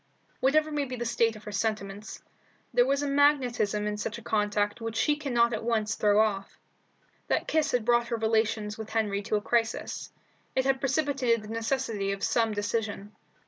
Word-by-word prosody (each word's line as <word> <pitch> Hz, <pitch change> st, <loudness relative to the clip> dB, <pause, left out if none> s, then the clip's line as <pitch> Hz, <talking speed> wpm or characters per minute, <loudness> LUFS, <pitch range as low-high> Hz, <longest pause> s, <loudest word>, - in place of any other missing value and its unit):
Whatever 310 Hz, +3 st, +3 dB
may 295 Hz, -1 st, 0 dB
be 255 Hz, -1 st, -5 dB
the 240 Hz, -1 st, -4 dB
state 230 Hz, -1 st, +1 dB
of 215 Hz, -, -12 dB
her 210 Hz, -, -7 dB
sentiments, 205 Hz, -1 st, -3 dB, 0.5 s
there 245 Hz, +2 st, +4 dB
is 280 Hz, +1 st, +1 dB
a -, -, -1 dB
magnetism 255 Hz, -7 st, +2 dB
in 210 Hz, 0 st, -2 dB
such 210 Hz, +1 st, -4 dB
a 230 Hz, -, -11 dB
contact 210 Hz, -1 st, 0 dB
which 225 Hz, 0 st, -4 dB
she 295 Hz, +6 st, +2 dB
cannot 240 Hz, -5 st, +1 dB
at -, -, -3 dB
once 220 Hz, -2 st, 0 dB
throw 210 Hz, -1 st, +3 dB
off. 205 Hz, -3 st, 0 dB, 0.7 s
That -, -, 0 dB
kiss 315 Hz, -1 st, +1 dB
had 245 Hz, -3 st, 0 dB
brought 240 Hz, 0 st, +3 dB
her 235 Hz, -, -1 dB
relations 220 Hz, -1 st, 0 dB
with 220 Hz, 0 st, -6 dB
Henry 210 Hz, -3 st, 0 dB
to 215 Hz, +1 st, -1 dB
a 210 Hz, -, +1 dB
crisis. 225 Hz, 0 st, -1 dB, 0.4 s
It 260 Hz, -, +2 dB
had 270 Hz, 0 st, +2 dB
precipitated 270 Hz, -5 st, +1 dB
the 210 Hz, -, -10 dB
necessity 225 Hz, -3 st, -1 dB
of 195 Hz, -, -7 dB
some 225 Hz, -2 st, +2 dB
decision. 205 Hz, 0 st, -2 dB
225 Hz, 185 wpm, -28 LUFS, 210-250 Hz, 0.7 s, there